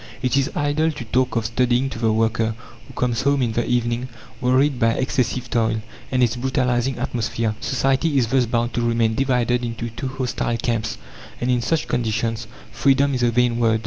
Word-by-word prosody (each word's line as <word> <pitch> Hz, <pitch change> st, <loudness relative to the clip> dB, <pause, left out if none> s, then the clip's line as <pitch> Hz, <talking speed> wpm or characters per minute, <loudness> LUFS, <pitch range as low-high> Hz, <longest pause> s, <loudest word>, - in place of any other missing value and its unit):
It 125 Hz, +1 st, +1 dB
is 140 Hz, +1 st, +2 dB
idle 145 Hz, +2 st, +1 dB
to 145 Hz, -5 st, -7 dB
talk 125 Hz, +3 st, 0 dB
of 115 Hz, -1 st, 0 dB
studying 125 Hz, +3 st, +1 dB
to 115 Hz, -, -6 dB
the 115 Hz, -1 st, +2 dB
worker, 110 Hz, 0 st, +1 dB, 0.3 s
who -, -, -13 dB
comes 120 Hz, -2 st, 0 dB
home 140 Hz, -1 st, +2 dB
in 115 Hz, -, 0 dB
the 120 Hz, +2 st, 0 dB
evening 120 Hz, 0 st, 0 dB, 0.3 s
wearied 130 Hz, +2 st, +2 dB
by 115 Hz, 0 st, +3 dB
excessive 130 Hz, -1 st, -1 dB
toil, 110 Hz, -2 st, 0 dB, 0.3 s
and 130 Hz, -1 st, +3 dB
its 120 Hz, 0 st, +2 dB
brutalizing 125 Hz, 0 st, 0 dB
atmosphere. 115 Hz, -2 st, -1 dB
Society 135 Hz, +3 st, +1 dB
is 125 Hz, -, +4 dB
thus 125 Hz, +1 st, +2 dB
bound 120 Hz, 0 st, 0 dB
to 120 Hz, -, 0 dB
remain 115 Hz, -1 st, +2 dB
divided 125 Hz, -1 st, +1 dB
into 115 Hz, 0 st, -4 dB
two 125 Hz, +4 st, -5 dB
hostile 130 Hz, -2 st, -2 dB
camps, 115 Hz, -2 st, -2 dB, 0.4 s
and 125 Hz, +1 st, 0 dB
in 125 Hz, -1 st, +2 dB
such 160 Hz, +6 st, 0 dB
conditions 115 Hz, -1 st, -1 dB, 0.2 s
freedom 140 Hz, +3 st, +3 dB
is 125 Hz, -, -1 dB
a 120 Hz, -, +4 dB
vain 120 Hz, 0 st, +2 dB
word. 115 Hz, -1 st, +3 dB
120 Hz, 190 wpm, -22 LUFS, 115-130 Hz, 0.4 s, is